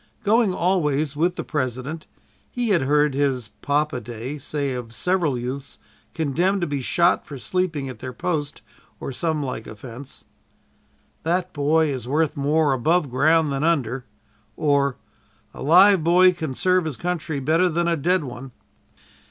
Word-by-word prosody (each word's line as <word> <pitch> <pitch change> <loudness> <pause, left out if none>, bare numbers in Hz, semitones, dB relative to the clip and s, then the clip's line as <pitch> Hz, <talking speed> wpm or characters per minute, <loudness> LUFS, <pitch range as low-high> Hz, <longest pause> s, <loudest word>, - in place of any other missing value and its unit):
Going 220 0 +3
always 155 -6 0
with 175 +4 +1
the - - -4
President, 135 +2 -4 0.4
he 245 -2 -2
had 185 -5 +3
heard 150 +1 +2
his 135 -5 0
"Papa 145 -2 0
day" 120 +5 -6
say 140 0 -3
of 120 -2 -6
several 175 -6 +1
youths 130 +3 -6 0.4
condemned 175 +6 0
to - - +1
be 145 -3 -3
shot 170 +7 +2
for 140 - -7
sleeping 160 -1 -2
at 125 -4 -8
their 130 +1 -6
post 150 +2 -3 0.4
or - - -5
some 155 +2 -1
like 125 -4 -5
offense: 120 +5 -10 1.0
"That 180 +2 -1
boy 155 +2 +2
is 130 -4 -4
worth 155 +3 +1
more 145 +1 +2
above 155 +3 +1
ground 155 +4 +3
than 135 +1 -1
under;" 135 -6 0 0.5
or, 140 -3 +1 0.6
"A - - -10
live 180 +4 +6
boy 180 +2 +6
can 160 -6 -5
serve 185 +1 +2
his 155 -5 -4
country 170 -4 -3
better 160 +7 +2
than 170 +1 0
a 170 - +2
dead 175 +3 +1
one." 130 -1 -8
150 Hz, 155 wpm, -23 LUFS, 135-170 Hz, 1.0 s, live